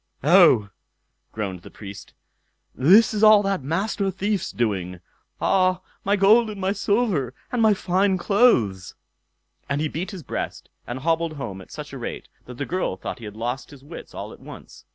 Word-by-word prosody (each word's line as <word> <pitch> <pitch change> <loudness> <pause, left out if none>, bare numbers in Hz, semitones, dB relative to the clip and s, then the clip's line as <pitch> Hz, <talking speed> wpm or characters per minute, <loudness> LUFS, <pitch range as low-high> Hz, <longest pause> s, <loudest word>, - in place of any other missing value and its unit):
"Oh!" 150 - +5 0.6
groaned 95 -5 -5
the - - -12
Priest, 100 -1 -11 0.6
"this 195 - +5
is 210 - -2
all 215 -1 +7
that 195 -4 -1
Master 195 +7 -1
Thief's 195 0 -2
doing. 95 -6 -2 0.4
Ah! 185 -1 +2 0.2
my 200 +1 +2
gold 215 +3 +5
and 205 -2 -7
my 190 0 0
silver, 200 - 0 0.2
and 245 - 0
my 215 -2 +5
fine 190 +1 +1
clothes." 125 - +2 0.7
And 140 +1 0
he 155 - 0
beat 170 +5 -4
his 190 -6 -8
breast, - - -5 0.2
and 125 +2 -5
hobbled 165 +1 0
home 115 -10 -6
at - - -15
such - - -8
a - - -6
rate - - -6 0.2
that 125 -1 -10
the 145 - -3
girl 175 - -2
thought 125 - -6
he 115 - -9
had 105 0 -8
lost 120 +3 -4
his 140 -2 -14
wits 160 +4 -11
all - - -7
at - - -15
once. - - -13
170 Hz, 180 wpm, -23 LUFS, 120-200 Hz, 0.7 s, all